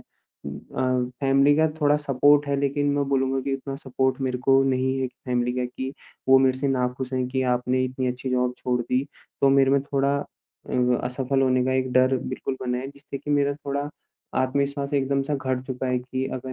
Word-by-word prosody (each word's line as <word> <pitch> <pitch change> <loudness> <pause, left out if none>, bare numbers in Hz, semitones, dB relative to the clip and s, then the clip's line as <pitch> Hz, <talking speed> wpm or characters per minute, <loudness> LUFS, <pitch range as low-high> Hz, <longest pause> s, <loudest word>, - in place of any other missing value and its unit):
अ, 125 - -4
family 140 +1 +4
का 160 +1 +4
थोड़ा 145 0 +4
support 145 0 +3
है 140 - +1
लेकिन 140 +1 0
मैं 145 0 +1
बोलूँगा 135 -1 +1
कि 140 - -2
उतना 135 0 -5
सपोर्ट 130 -1 -1
मेरे 130 -1 -1
को 135 0 +6
नहीं 130 0 +1
है 130 - 0
फ़ैमिली 125 -1 -2
का 125 0 -1
कि 130 +2 -5 0.4
वो 135 - +8
मेरे 130 -1 +2
से 140 +1 0
नाखुश 125 0 -1
हैं 130 -1 0
कि 130 0 -1
आपने 125 +1 0
इतनी 130 0 -3
अच्छी 125 +1 -4
जॉब 125 0 +1
छोड़ 125 -1 0
दी। 125 +3 0 0.4
तो 140 - +5
मेरे 135 -1 +4
में 140 0 +4
थोड़ा 140 0 0 0.5
अ, 125 -1 +2
असफल 135 +2 0
होने 130 -1 +2
का 130 - +1
एक 130 -1 0
डर 130 +1 +4
बिल्कुल 130 - -4
बना 125 -1 -1
है 130 +2 -5
जिससे 140 0 -9
कि 145 +2 -6
मेरा 145 -1 +2
थोड़ा 140 0 -3 0.5
आत्मविश्वास 140 +2 -1
एकदम-सा 140 +1 0
घट 130 -2 -1
चुका 130 0 -3
है 125 0 +1
कि 130 +1 -4
अगर 130 0 -6
130 Hz, 200 wpm, -24 LUFS, 125-140 Hz, 0.5 s, वो